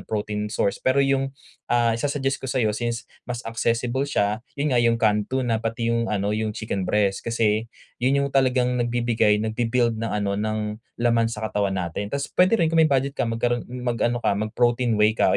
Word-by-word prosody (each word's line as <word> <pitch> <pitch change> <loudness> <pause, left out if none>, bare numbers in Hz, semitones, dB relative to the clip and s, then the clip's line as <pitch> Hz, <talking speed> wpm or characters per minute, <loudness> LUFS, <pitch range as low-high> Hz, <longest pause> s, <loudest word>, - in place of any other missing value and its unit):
protein 105 0 -3
source. 105 -2 -1
Pero 135 +2 +3
yung, 135 0 +1 0.4
ah, 120 -1 +3
isa-suggest 135 +3 -1
ko 135 - -5
sayo 120 -4 +1
since 115 +1 -3 0.2
mas 125 0 -4
accessible 120 +4 -1
siya, 105 -4 0 0.2
yun 145 0 0
nga 120 - +4
yung 115 -1 +3
canned 105 -3 +1
tuna, 125 -4 0
pati 115 +1 -1
yung 115 0 0
ano 100 0 0
yung 110 0 -2
chicken 100 -4 -3
breast. 100 -1 +1
Kasi 115 -1 0 0.3
yun 140 +3 +2
yung - - -1
talagang 125 -2 +2
nagbibigay 120 -3 +2
nagbi-build 115 +1 0
ng 115 - -2
ano 100 -1 -1
ng 105 +1 -2 0.2
laman 115 -1 +2
sa 110 -1 -5
katawan 100 -3 -1
natin. 90 +3 -3
Tas 140 +4 -2
puwede 185 +5 +3
rin 165 -4 +1
kung 165 - +4
may 160 - +5
budget 135 -1 +1
ka 120 - -1
magkaroon 120 +2 -1
mag-ano 120 -1 -1
ka - - +3
mag-protein 120 +3 +1
whey 105 +1 +4
ka - - +2
115 Hz, 190 wpm, -24 LUFS, 105-125 Hz, 0.4 s, may